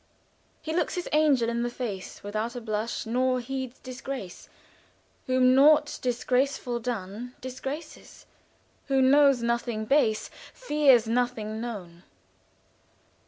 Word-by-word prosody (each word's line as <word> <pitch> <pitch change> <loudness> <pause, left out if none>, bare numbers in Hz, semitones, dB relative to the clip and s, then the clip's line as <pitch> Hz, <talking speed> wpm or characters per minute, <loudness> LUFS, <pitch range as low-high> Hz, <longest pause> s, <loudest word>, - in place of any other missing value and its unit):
"He 315 - -3
looks 350 - 0
his 355 - -3
angel 295 -6 +3
in 235 0 -1
the 240 - -1
face 225 -6 -6
Without 215 +4 -3
a - - -3
blush: 220 +1 -3
nor 255 +2 +1
heeds 260 0 -5
disgrace, 255 -6 -7 0.8
Whom 255 0 +4
naught 295 +3 +5
disgraceful 250 0 0
done 230 +1 -5
Disgraces. 270 +5 -8 0.6
Who 270 -1 +2
knows 275 -1 +5
nothing 235 -2 -1
base 220 -4 +2 0.2
Fears 290 - +4
nothing 225 -2 -1
known." 185 -8 -7
245 Hz, 115 wpm, -27 LUFS, 225-270 Hz, 0.8 s, naught